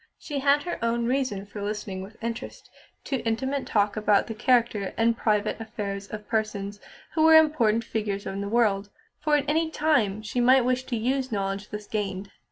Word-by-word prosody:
She 290 -2 -4
had 285 +1 +3
her 350 - -4
own 235 0 +1
reason 250 -6 -1
for 205 +1 -8
listening 205 -2 -4
with 200 +3 -10
interest 230 0 -6 0.3
to 270 - -1
intimate 265 +5 -2
talk 205 -1 +1
about 210 -2 +3
the 225 - -5
character 225 -3 +1
and 230 0 +3
private 215 -1 0
affairs 205 -3 -5
of 210 0 -8
persons 210 -2 -2 0.3
who 315 - +1
were 320 0 +7
important 240 -9 +4
figures 210 -3 -3
in 195 +1 -4
the 200 - -3
world, 210 -3 +2 0.3
for 300 0 +2
at 285 - -1
any 320 +2 +1
time 245 -11 +1
she 220 +3 -3
might 255 +1 +5
wish 255 0 0
to 240 - -2
use 260 +3 -1
knowledge 195 -1 -2
thus 210 0 -6
gained. 200 -2 -3
225 Hz, 185 wpm, -26 LUFS, 205-260 Hz, 0.3 s, were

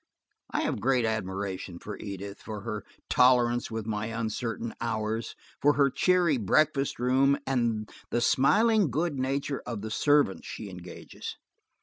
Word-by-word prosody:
I - - -1
have - - -1
great 125 0 +2
admiration 95 -4 -3
for 105 +3 -7
Edith, 100 0 -7
for 105 -2 -6
her 105 -1 -4 0.2
tolerance 120 -1 +4
with 110 -1 -4
my 105 -1 -2
uncertain 115 0 -3
hours, 110 -1 -2 0.3
for 145 +1 +5
her 140 -2 +3
cheery 180 -4 +3
breakfast 140 +6 +2
room, 130 +3 +3
and 115 -5 0 0.2
the 120 - +1
smiling 205 - +4
good 150 +2 -1
nature 135 +1 -1
of 115 -4 -5
the 110 - -5
servants 145 -6 +2
she 105 -3 -7
engages. 90 -1 -8
115 Hz, 140 wpm, -28 LUFS, 105-135 Hz, 0.3 s, for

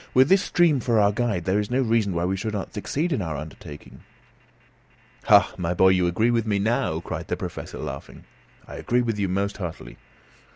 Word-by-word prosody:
"With 130 +3 +5
this 195 0 +5
stream 170 -8 +2
for 115 -2 +1
our 100 -1 +4
guide, 105 -5 -1
there 95 +2 +1
is 105 - -3
no 130 +2 +1
reason 110 -5 +1
why 85 +1 0
we 95 +1 0
should 110 +3 -4
not 100 - -5
succeed 150 - -2
in 125 - -1
our 80 -5 -3
undertaking." 75 0 -10 1.3
"Ah, - - +6
my 90 0 -1
boy! 95 +1 +5
you 90 -1 +3
agree 110 +7 +1
with 115 -2 0
me 105 -2 +1
now," 110 +4 0
cried - - -6
the - - -2
Professor, - - -7
laughing. - - -8 0.4
"I - - -9
agree 125 +1 0
with 115 -3 -2
you 100 -2 0
most 100 +2 -1
heartily." 80 -10 -7
105 Hz, 205 wpm, -24 LUFS, 90-120 Hz, 1.3 s, Ah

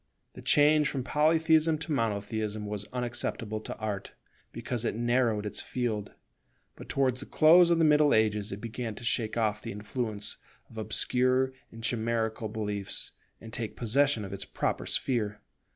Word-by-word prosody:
The - - -10
change 150 +1 +5
from 135 -3 -3
Polytheism 160 +2 +3
to 155 +1 -6
Monotheism 110 -3 -1
was 105 0 -4
unacceptable 120 -3 -2
to - - -7
Art, 105 -3 -4 0.4
because 120 0 -3
it 115 - -1
narrowed 120 -2 +1
its 105 0 -3
field; 110 -5 -3 0.6
but - - -12
towards 130 -2 +1
the 140 - -8
close 170 +3 +6
of 170 - +4
the 165 - +4
Middle 150 -1 +5
Ages 105 -1 +2
it 100 - -5
began 115 -1 -5
to - - -10
shake 115 -1 0
off 110 -2 0
the - - -6
influence 105 0 -4 0.3
of 115 - -8
obscure 130 +4 +1 0.2
and 115 0 -11
chimerical 115 -1 -1
beliefs, 105 -3 -3 0.3
and 110 -1 -11
take 115 -3 -4
possession 120 -1 +2
of 95 - -7
its 100 - -4
proper - - -2
sphere. 105 -5 0
115 Hz, 160 wpm, -29 LUFS, 105-130 Hz, 0.6 s, close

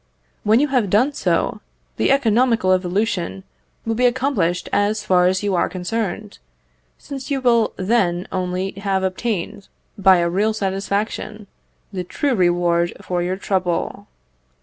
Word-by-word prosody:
When 215 +3 +4
you 295 +1 +2
have 250 -7 +1
done 245 +9 +3
so, - - 0 0.4
the - - +1
economical 235 -6 +3
evolution 180 - -1 0.4
will 225 - 0
be 250 +2 +3
accomplished 245 -9 0
as 210 +1 +1
far 180 -2 +4
as 185 +2 0
you 200 -1 0
are 175 - +1
concerned, 205 +2 -4 0.6
since 275 -2 -8
you 280 -2 0
will 235 -3 +2
then 185 -3 0
only 185 +1 -2
have 195 -1 -1
obtained, 200 0 -3 0.3
by 190 -1 +6
a 170 0 +1
real 205 +5 +1
satisfaction, 205 +1 -3 0.5
the 185 -1 -3
true 275 +9 -1
reward 175 -3 +2
for 180 -1 -2
your 180 +2 -2
trouble. 185 -3 -2
195 Hz, 140 wpm, -20 LUFS, 180-225 Hz, 0.6 s, by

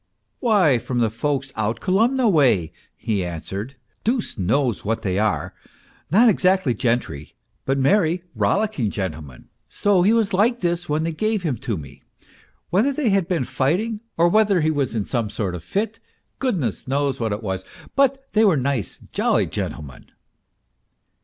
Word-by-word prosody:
" 110 - -51
Why, 190 - +3
from 120 -1 0
folks 135 +3 -2
out 110 +1 -1
Kolomna 230 +7 +2
way," 130 - +3 0.3
he 105 -4 -1
answered. 95 - -5
" - - -44
Deuce 235 0 -1
knows 115 +5 0
what 110 +2 -2
they 95 -2 0
are, 110 0 0 0.6
not 215 - +5
exactly 185 - +3
gentry, 115 - -2 0.3
but 135 +1 +1
merry, 170 +4 +2
rollicking 200 - 0
gentlemen; 80 - -6 0.2
so 200 -3 +2
he 195 +4 +4
was 225 -3 +2
like 235 +6 +2
this 175 -1 -1
when 150 +1 +1
they 165 - -1
gave 215 +4 -1
him 150 -7 0
to 115 -3 -3
me; 70 -2 -11 0.7
whether 215 +10 +3
they 270 -3 0
had 195 -4 +2
been 170 -7 0
fighting, 165 - -1 0.2
or 170 +1 +5
whether 200 -1 +3
he 155 +1 +2
was 140 -6 -1
in 105 -3 -1
some 115 -5 -1
sort 100 -4 -3
of 90 - -5
a - - -26
fit, 215 +2 -2 0.4
goodness 170 - -1
knows 140 0 0
what 115 -2 -1
it 105 +2 -3
was; 95 -2 -3 0.3
but 275 -1 +2
they 220 - +4
were 190 -8 +4
nice, 135 -4 -2
jolly - - +2
gentlemen 70 -5 -6
145 Hz, 165 wpm, -22 LUFS, -, 0.7 s, not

